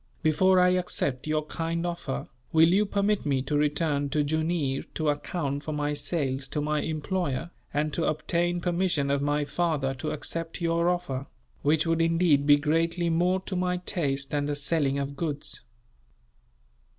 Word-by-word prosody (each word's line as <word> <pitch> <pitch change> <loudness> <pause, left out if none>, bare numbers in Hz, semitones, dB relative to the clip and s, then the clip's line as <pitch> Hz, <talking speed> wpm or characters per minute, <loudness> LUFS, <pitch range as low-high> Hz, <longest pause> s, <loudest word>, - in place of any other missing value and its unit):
"Before 185 +5 +4
I 180 0 +5
accept 165 -7 0
your 155 0 0
kind 165 +2 -2
offer, 170 -6 -3 0.2
will 160 +1 +6
you 200 +4 +3
permit 200 +1 +1
me 135 -3 0
to 145 +2 -2
return 145 -1 +1
to 150 +1 +1
Jooneer 155 -2 0
to 155 -2 +1
account 145 -1 -2
for 155 - -4
my 150 0 -1
sales 140 -3 -2
to 150 - -3
my 150 0 0
employer, 160 -1 -2 0.2
and 150 +1 -1
to 165 - 0
obtain 170 +3 0
permission 175 -5 0
of 140 0 +1
my 145 +1 +1
father 150 -5 0
to 150 +4 -4
accept 165 +2 -4
your 170 0 +2
offer; 145 -7 -2 0.3
which 155 +2 +2
would 165 0 +1
indeed 165 -4 +3
be 145 0 +8
greatly 165 +3 +1
more 180 +3 +2
to 190 - -5
my 180 0 0
taste 140 -6 -2
than 145 -1 0
the 145 0 -1
selling 145 -1 +1
of 140 0 -3
goods." 145 -2 -2
155 Hz, 165 wpm, -27 LUFS, 145-170 Hz, 0.3 s, be